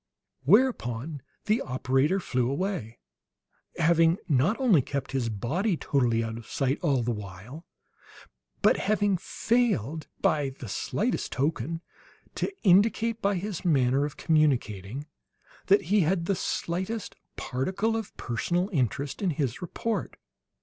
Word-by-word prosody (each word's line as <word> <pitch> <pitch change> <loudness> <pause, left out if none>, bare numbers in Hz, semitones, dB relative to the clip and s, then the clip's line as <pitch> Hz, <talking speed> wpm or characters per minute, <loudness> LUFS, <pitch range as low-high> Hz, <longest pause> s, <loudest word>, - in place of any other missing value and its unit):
Whereupon 150 - +2 0.2
the 215 +2 +2
operator 130 +7 +1
flew 125 -8 0
away, 140 - -3 0.8
having 165 +1 +4
not 155 - +2
only 225 - +5
kept 140 +1 -4
his 130 -4 -1
body 160 - -1
totally 120 -6 +1
out 115 0 -4
of 115 - -13
sight 135 0 0
all 140 -7 +2
the 120 - 0
while, 105 - -8 1.0
but - - +5
having 205 -1 +1
failed 180 - 0
by 140 -3 +1
the 125 - -7
slightest - - -1
token 155 +3 -1 0.5
to - - -2
indicate, 225 +4 +3
by 200 -1 +2
his 190 0 -4
manner 135 -4 +3
of 145 -1 -4
communicating 135 - +1 0.6
that 200 +2 +5
he 210 - +6
had 170 0 +1
the 195 - +1
slightest 190 +4 -3 0.2
particle 190 - -1
of 225 -2 -5
personal 175 - -1
interest 140 - -1
in 195 - +1
his 140 -3 -2
report. 220 +6 -3
155 Hz, 130 wpm, -27 LUFS, 130-195 Hz, 1.0 s, he